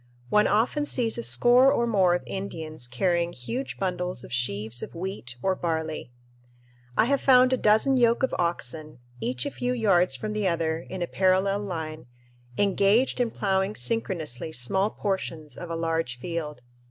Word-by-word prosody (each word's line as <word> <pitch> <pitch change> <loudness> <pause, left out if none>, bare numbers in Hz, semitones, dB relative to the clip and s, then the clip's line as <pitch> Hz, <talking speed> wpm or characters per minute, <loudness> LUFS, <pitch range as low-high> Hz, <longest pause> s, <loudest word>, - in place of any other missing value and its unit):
One 210 +6 +4
often 240 +8 +1
sees 240 -5 +1
a - - -1
score 240 - +5
or 235 - +1
more 190 -6 +3
of 175 - -3
Indians 160 -8 -6
carrying 170 +6 0
huge 235 - -5
bundles 180 -6 -2
of - - -10
sheaves 115 -1 -2
of - - -8
wheat 170 -8 -6
or 190 - +2
barley. 160 -6 -3 0.9
I - - +5
have 280 +2 +1
found 255 -1 +5
a - - +2
dozen 220 +5 +3
yoke 235 0 +3
of 265 - +1
oxen, 155 -4 -3 0.2
each 125 +2 -3
a - - -3
few 250 0 -2
yards 185 - +3
from 210 +12 -4
the 210 -2 0
other 165 -2 0
in 185 -2 -4
a - - -3
parallel 190 +2 +2
line, 160 -8 -5 0.5
engaged 205 +6 +2
in 245 -2 +1
ploughing 195 -1 -1
synchronously 165 - -1
small 190 - +1
portions 165 -9 -4
of 175 - -8
a 165 - -3
large 165 -6 -2
field. 150 -2 -5
180 Hz, 165 wpm, -26 LUFS, 155-215 Hz, 0.9 s, score